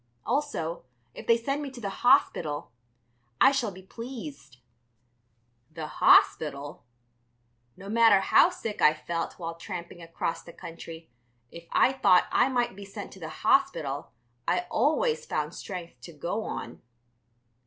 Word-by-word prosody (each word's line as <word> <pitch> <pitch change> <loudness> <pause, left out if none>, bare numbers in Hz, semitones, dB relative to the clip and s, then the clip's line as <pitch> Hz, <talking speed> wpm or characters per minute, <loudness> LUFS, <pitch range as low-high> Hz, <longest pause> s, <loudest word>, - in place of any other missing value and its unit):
Also, 275 - -2 0.3
if - - -10
they 230 - +5
send 275 +5 -2
me 285 - -4
to 260 -2 -11
the 200 -4 -4
Hospital, 175 - +2 0.7
I - - +7
shall 260 -5 0
be 190 -1 -12
pleased." 185 - -9 1.1
The 160 0 -6 0.2
Hospital! 145 -2 +4 0.9
No 195 - -11
matter 225 -1 +5
how 330 - +5
sick 230 - -6
I 150 - +6
felt 165 +2 -4
while 165 -2 -5
tramping 175 0 -8
across 165 0 -3
the 170 - -13
country, 165 -2 -10 0.4
if 170 0 -11
I 260 - +4
thought 185 -9 +4
I - - +3
might 245 -6 0
be 200 - -9
sent 200 +1 -8
to 190 - -13
the 160 -2 -6
hospital 185 - +1 0.4
I 180 +1 +2
always 470 +9 +1
found - - -2
strength 170 - -8
to 170 - -11
go 175 +9 -3
on. - - -6
190 Hz, 145 wpm, -28 LUFS, 165-245 Hz, 1.1 s, I